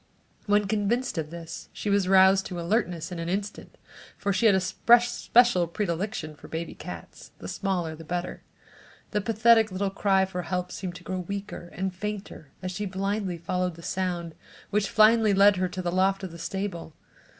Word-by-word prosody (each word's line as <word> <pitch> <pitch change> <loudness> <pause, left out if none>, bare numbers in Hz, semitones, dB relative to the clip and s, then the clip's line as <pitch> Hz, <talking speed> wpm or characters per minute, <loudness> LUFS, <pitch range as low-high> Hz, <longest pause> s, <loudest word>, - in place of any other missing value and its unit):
When 205 0 +3
convinced 215 +1 0
of 155 -1 -4
this 165 0 -8
she - - -7
was 200 -2 +2
roused 190 0 +5
to 180 -2 -5
alertness 175 -2 -1
in 175 - -5
an 165 0 -3
instant 200 +3 -4 0.4
for 200 -1 -1
she 210 +4 +3
had 200 - +5
a - - +3
special 235 0 +4
predilection 170 -2 -3
for 150 - -14
baby 165 +1 -5
cats, - - -10
the - - -8
smaller 180 -5 -2
the 165 - -11
better. 175 +2 -4 0.7
The 210 - 0
pathetic 225 0 +4
little 195 +1 -1
cry 195 -1 +2
for 180 -1 -4
help 180 +1 -3
seemed 180 -2 -5
to 180 - -11
grow 185 0 -3
weaker 200 -1 -6
and 190 0 -2
fainter 200 -5 -6
as 185 - -3
she 205 +3 -3
blindly 195 -1 -2
followed 180 +1 -2
the 170 - -13
sound, 175 -3 -2 0.4
which 205 -1 +1
finally 215 -1 +5
led 200 0 +6
her 185 0 +1
to 185 +1 -5
the 175 - -1
loft 190 +2 +1
of 185 - -5
the 170 - -10
stable. 175 -3 -4
190 Hz, 185 wpm, -27 LUFS, 175-205 Hz, 0.7 s, led